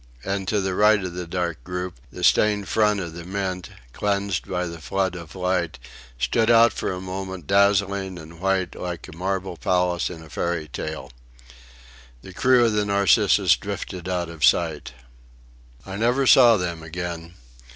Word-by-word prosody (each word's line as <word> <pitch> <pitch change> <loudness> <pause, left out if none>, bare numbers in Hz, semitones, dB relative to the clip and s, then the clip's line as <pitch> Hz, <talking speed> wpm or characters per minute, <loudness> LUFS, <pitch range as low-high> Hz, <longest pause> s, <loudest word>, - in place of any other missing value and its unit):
And 95 -1 -3
to 105 - +1
the 95 -1 -1
right 105 +2 +4
of 90 -2 -5
the 90 -1 -5
dark 85 -6 -3
group 90 -3 -5
the - - -8
stained 105 -2 +3
front 105 -2 +2
of 85 -3 -5
the 85 0 -8
Mint, 95 -1 -4 0.2
cleansed 100 -3 -1
by 90 -1 -1
the 85 -1 -7
flood 95 +2 -1
of 85 -1 -9
light, 90 -2 -1 0.4
stood 110 - +1
out 115 0 +6
for - - -3
a 90 - -4
moment 95 -2 -6
dazzling 100 -1 +2
and 80 0 -12
white 95 -1 0
like 90 -3 -6
a - - -11
marble 95 0 -3
palace 90 -1 0
in 80 -2 -9
a 80 - -14
fairy 85 -2 -2
tale. 75 -2 -6 1.1
The 95 - -11
crew 125 +4 +4
of 115 - +1
the 105 -1 +1
Narcissus 100 -2 +4
drifted 90 0 -6
out 90 -2 -1
of 85 -3 -8
sight. 80 -6 +2 0.9
I 95 0 -6
never 120 +5 +2
saw 120 -3 +7
them 85 -3 -3
again. 85 +1 -6
90 Hz, 170 wpm, -23 LUFS, 85-100 Hz, 1.1 s, saw